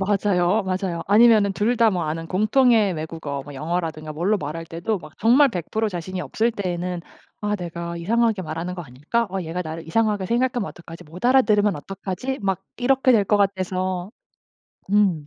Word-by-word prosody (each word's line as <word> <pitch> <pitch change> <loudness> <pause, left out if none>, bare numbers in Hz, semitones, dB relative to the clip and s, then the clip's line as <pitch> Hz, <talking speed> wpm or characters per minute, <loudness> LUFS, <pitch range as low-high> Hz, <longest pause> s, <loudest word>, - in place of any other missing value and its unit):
맞아요, 195 -1 +2
맞아요. 185 -2 -2
아니면은 210 -1 +5
둘 215 +5 +1
다 230 -1 +5
뭐 180 -3 -1
아는 160 +2 -3
공통의 215 +2 +3
외국어 155 -3 -5
영어라든가 155 +1 -3
뭘로 185 +7 +1
말할 160 +1 -5
때도 170 +6 -3
막 - - -13
정말 255 +6 +5
100% 215 +4 -2
자신이 185 +1 -5
없을 230 +5 0
때에는 180 -4 -3 0.4
'아 210 0 0
내가 170 -1 -5
이상하게 225 +3 +1
말하는 165 +2 -4
거 175 - -6
아닐까.' 150 - -2
'어 195 0 -2
얘가 165 +2 -4
나를 160 -1 -7
이상하게 210 +2 +1
생각하면 240 0 0
어떡하지?' 170 -1 -11
'못 165 +4 -12
알아들으면 215 - +4
어떡하지?' 195 - -5
막 195 -3 -1 0.2
이렇게 260 +1 +3
될 215 -4 +4
것 210 - +3
같아서 185 -2 -1 0.8
음. 185 -8 +3
190 Hz, 370 characters per minute, -23 LUFS, 170-215 Hz, 0.8 s, 아니면은